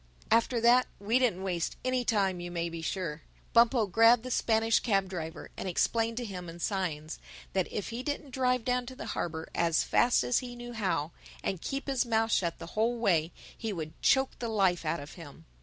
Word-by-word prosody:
After 230 +2 +3
that 245 +2 +5
we 220 +5 +2
didn't 220 -8 +1
waste 175 -3 -2
any 255 -1 +1
time, 195 -6 +1
you 175 0 -5
may 170 -1 -2
be 165 0 -6
sure. 160 -2 -3 0.3
Bumpo 235 -1 +5
grabbed 230 +4 +5
the 255 - -5
Spanish 225 -1 +3
cab 195 -4 +1
driver 165 -3 -6
and 190 - -4
explained 230 +5 +1
to 245 - -2
him 180 -4 -6
in 165 - -9
signs 170 -5 -3 0.3
that 190 -2 0
if 205 - -3
he 235 +1 -4
didn't 285 0 -4
drive 250 -2 +1
down 250 -1 0
to 260 - -8
the - - -7
harbor 160 -1 -3
as 165 -1 +2
fast 245 +1 +3
as 245 - +2
he 245 -2 -7
knew 240 0 -8
how 185 -8 -1 0.3
and 190 -4 -2
keep 275 +1 -3
his 270 -2 +1
mouth 225 -1 +1
shut 170 -4 +1
the 165 0 -10
whole 230 +3 +1
way, 175 -8 +2 0.2
he 225 -2 -4
would 160 -5 -5
choke 265 0 +3
the 235 - -3
life 190 -6 +2
out 165 +2 0
of 145 +1 -9
him. 145 - -12
210 Hz, 205 wpm, -30 LUFS, 170-240 Hz, 0.3 s, that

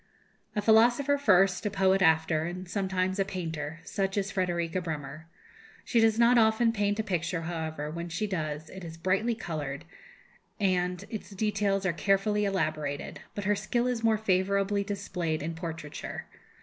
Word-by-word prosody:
A 210 - 0
philosopher 240 +6 +5
first, 195 -7 +4
a 210 - 0
poet 195 -1 +2
after, 160 -2 +3
and 180 +2 -5
sometimes 190 0 -1
a - - +4
painter, 165 -4 -5
such 195 -1 -2
is 195 -1 0
Frederika 180 -2 -1
Bremer. 155 -2 -6 0.6
She 235 - +2
does 225 -1 +4
not 235 +1 +6
often 220 +1 +4
paint 205 -1 0
a - - +1
picture, 175 -4 -2
however; 160 -3 -4
when 170 +2 -5
she 170 +6 -2
does, 155 -5 -3
it 190 -1 -9
is 165 -1 -8
brightly 195 +7 +1
coloured, 155 -6 -5 0.7
and 180 -1 0
its 220 - -6
details 200 -1 0
are 180 - +2
carefully 200 +5 +1
elaborated; 155 -7 -2 0.2
but 205 - -3
her 205 +1 +2
skill 225 +4 0
is 245 -2 -1
more 225 -1 +4
favourably 200 0 +1
displayed 185 -6 -3
in 165 +2 -3
portraiture. 165 -3 -6
190 Hz, 160 wpm, -29 LUFS, 165-205 Hz, 0.7 s, not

